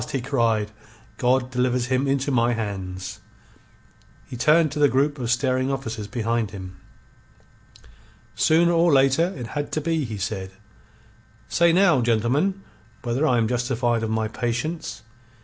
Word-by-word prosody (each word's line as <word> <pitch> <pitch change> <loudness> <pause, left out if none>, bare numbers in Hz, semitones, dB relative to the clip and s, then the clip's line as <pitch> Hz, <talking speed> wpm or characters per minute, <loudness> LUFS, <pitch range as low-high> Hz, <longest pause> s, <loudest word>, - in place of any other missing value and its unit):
he 135 - 0
cried. 115 -5 0 0.5
"God 130 0 +1
delivers 125 0 0
him 130 +2 0
into 135 +1 0
my 120 -1 +2
hands!" 95 -3 -5 1.1
He - - -9
turned 155 +5 +3
to 150 - -4
the 145 -1 +5
group 140 +2 +1
of 120 -2 -3
staring 130 +1 +1
officers 115 -6 -4
behind 115 -2 -1
him. 95 -3 -9 1.6
"Sooner 170 +2 +3
or 170 0 +3
later 135 +5 +3
it 120 - -5
had 145 -1 -3
to - - +1
be," 160 0 -1
he 110 -3 -5
said. 95 -1 -4 1.0
"Say 170 0 +4
now, 175 -6 +4
gentlemen, 125 - +1 0.4
whether 125 +6 0
I 125 - +3
am 115 -1 +2
justified 120 -1 0
of 110 - -2
my 110 0 0
patience. 120 +4 -4
125 Hz, 145 wpm, -23 LUFS, 115-145 Hz, 1.6 s, the